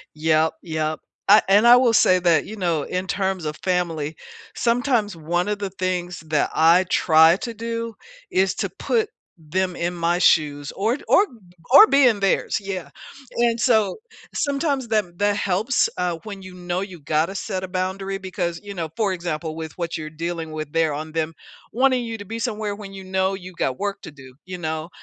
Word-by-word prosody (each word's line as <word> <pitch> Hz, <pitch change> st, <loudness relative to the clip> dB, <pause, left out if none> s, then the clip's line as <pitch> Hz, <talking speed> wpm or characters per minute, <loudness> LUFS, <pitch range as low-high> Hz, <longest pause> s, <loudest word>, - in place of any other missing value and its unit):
Yep. 155 Hz, +1 st, +2 dB
Yep, 155 Hz, -2 st, -2 dB, 0.3 s
uh, 210 Hz, +2 st, +8 dB
and 205 Hz, +4 st, +5 dB
I 240 Hz, +1 st, +9 dB
will 250 Hz, -2 st, +4 dB
say 185 Hz, -4 st, +5 dB
that, 170 Hz, -4 st, +3 dB
you 215 Hz, -, -8 dB
know, 170 Hz, -6 st, 0 dB
in 185 Hz, +4 st, -3 dB
terms 190 Hz, -2 st, -1 dB
of 150 Hz, -1 st, -4 dB
family, 165 Hz, -5 st, -1 dB, 0.4 s
sometimes 235 Hz, -4 st, +1 dB
one 175 Hz, +4 st, -1 dB
of 210 Hz, 0 st, -1 dB
the 200 Hz, -1 st, -4 dB
things 180 Hz, -2 st, -3 dB
that 155 Hz, -2 st, +1 dB
I 165 Hz, +3 st, +5 dB
try 160 Hz, -2 st, +5 dB
to 235 Hz, -1 st, -5 dB
do 230 Hz, +1 st, -4 dB, 0.4 s
is 190 Hz, +1 st, +2 dB
to -, -, -1 dB
put 450 Hz, -3 st, -1 dB, 0.3 s
them 180 Hz, +3 st, -2 dB
in 175 Hz, +1 st, -2 dB
my 170 Hz, 0 st, 0 dB
shoes, 145 Hz, -5 st, +2 dB
or 220 Hz, +5 st, 0 dB
t -, -, -15 dB
or 400 Hz, -, +5 dB, 0.5 s
or 420 Hz, +10 st, +10 dB
be 275 Hz, -8 st, +5 dB
in 220 Hz, -4 st, +1 dB
theirs, 195 Hz, -1 st, +1 dB
yeah, 195 Hz, -3 st, -5 dB, 0.5 s
and 235 Hz, -1 st, +2 dB
so, 220 Hz, -4 st, +3 dB, 0.4 s
sometimes 280 Hz, -3 st, -1 dB
that 210 Hz, -6 st, -1 dB
that 205 Hz, 0 st, +2 dB
helps, 205 Hz, +6 st, +1 dB
uh, 175 Hz, -2 st, -1 dB
when 200 Hz, -3 st, -8 dB
you 185 Hz, -1 st, -10 dB
know 180 Hz, 0 st, -3 dB
you 190 Hz, -3 st, -7 dB
gotta 155 Hz, +6 st, 0 dB
set 185 Hz, 0 st, -3 dB
a 190 Hz, -, -5 dB
boundary 190 Hz, +1 st, -3 dB
because, 180 Hz, -3 st, -4 dB
you 200 Hz, -1 st, -7 dB
know, 165 Hz, -4 st, -3 dB
for 210 Hz, -4 st, +1 dB
example, 165 Hz, -3 st, -4 dB
with 160 Hz, -1 st, -6 dB
what 170 Hz, -1 st, -3 dB
you're 155 Hz, -1 st, -6 dB
dealing 165 Hz, +1 st, -4 dB
with 155 Hz, -1 st, -6 dB
there, 160 Hz, -2 st, +2 dB
on 155 Hz, +2 st, -5 dB
them 160 Hz, 0 st, -2 dB, 0.4 s
wanting 255 Hz, +1 st, +2 dB
you 225 Hz, -1 st, -5 dB
to 205 Hz, -, -8 dB
be 225 Hz, +3 st, -6 dB
somewhere 215 Hz, -3 st, -2 dB
when 200 Hz, -1 st, -9 dB
you 195 Hz, -1 st, -9 dB
know 190 Hz, +1 st, 0 dB
you 185 Hz, -1 st, -8 dB
got 130 Hz, -7 st, -2 dB
work 200 Hz, 0 st, -3 dB
to -, -, -8 dB
do, 130 Hz, -3 st, -14 dB
you 185 Hz, 0 st, -6 dB
know? 160 Hz, -1 st, -3 dB
185 Hz, 195 wpm, -22 LUFS, 165-210 Hz, 0.5 s, or